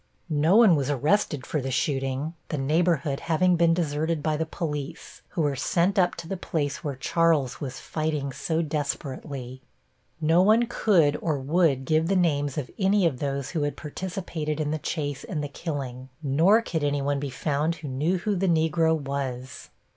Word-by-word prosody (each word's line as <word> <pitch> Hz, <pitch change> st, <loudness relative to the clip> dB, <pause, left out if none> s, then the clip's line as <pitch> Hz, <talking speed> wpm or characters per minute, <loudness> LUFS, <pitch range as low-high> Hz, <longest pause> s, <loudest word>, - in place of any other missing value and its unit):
No 155 Hz, +5 st, +3 dB
one 220 Hz, -6 st, +7 dB
was 140 Hz, -2 st, -1 dB
arrested 145 Hz, +1 st, +1 dB
for 150 Hz, -, -2 dB
the 135 Hz, -, -3 dB
shooting, 135 Hz, +3 st, -1 dB, 0.2 s
the 155 Hz, -, -2 dB
neighborhood 150 Hz, 0 st, +1 dB
having 175 Hz, +2 st, +2 dB
been 165 Hz, 0 st, +4 dB
deserted 160 Hz, -1 st, -1 dB
by 155 Hz, -1 st, +1 dB
the 160 Hz, +1 st, -2 dB
police, 150 Hz, -4 st, -5 dB
who 165 Hz, -, -2 dB
were 145 Hz, -2 st, +1 dB
sent 180 Hz, -, +1 dB
up 180 Hz, -1 st, +3 dB
to 165 Hz, -, -8 dB
the 195 Hz, -, -3 dB
place 145 Hz, -4 st, -2 dB
where 145 Hz, -3 st, -3 dB
Charles 150 Hz, -2 st, +1 dB
was 130 Hz, -3 st, -5 dB
fighting 155 Hz, -3 st, -2 dB
so 160 Hz, +5 st, -1 dB
desperately. 140 Hz, -3 st, -4 dB, 0.6 s
No 165 Hz, +2 st, +4 dB
one 220 Hz, +5 st, +5 dB
could 175 Hz, -10 st, +3 dB
or 155 Hz, -3 st, 0 dB
would 140 Hz, -1 st, +1 dB
give 155 Hz, +3 st, +2 dB
the 195 Hz, -, +1 dB
names 145 Hz, -6 st, +1 dB
of 140 Hz, -4 st, -3 dB
any 195 Hz, 0 st, +3 dB
of 140 Hz, -7 st, 0 dB
those 140 Hz, -1 st, -2 dB
who 160 Hz, -, -1 dB
had 145 Hz, -1 st, -2 dB
participated 160 Hz, -2 st, -4 dB
in 150 Hz, -1 st, -1 dB
the 155 Hz, -, -1 dB
chase 145 Hz, -3 st, -3 dB
and 150 Hz, -4 st, -4 dB
the -, -, -2 dB
killing, 135 Hz, -4 st, -5 dB
nor 165 Hz, +11 st, +4 dB
could 160 Hz, -8 st, -2 dB
any 145 Hz, -1 st, 0 dB
one 140 Hz, 0 st, 0 dB
be 140 Hz, 0 st, -3 dB
found 150 Hz, +4 st, -1 dB
who 155 Hz, -, -8 dB
knew 150 Hz, +8 st, 0 dB
who 205 Hz, +3 st, -1 dB
the 190 Hz, +1 st, 0 dB
Negro 160 Hz, 0 st, +2 dB
was. 135 Hz, -2 st, -5 dB
150 Hz, 185 wpm, -26 LUFS, 140-170 Hz, 0.6 s, one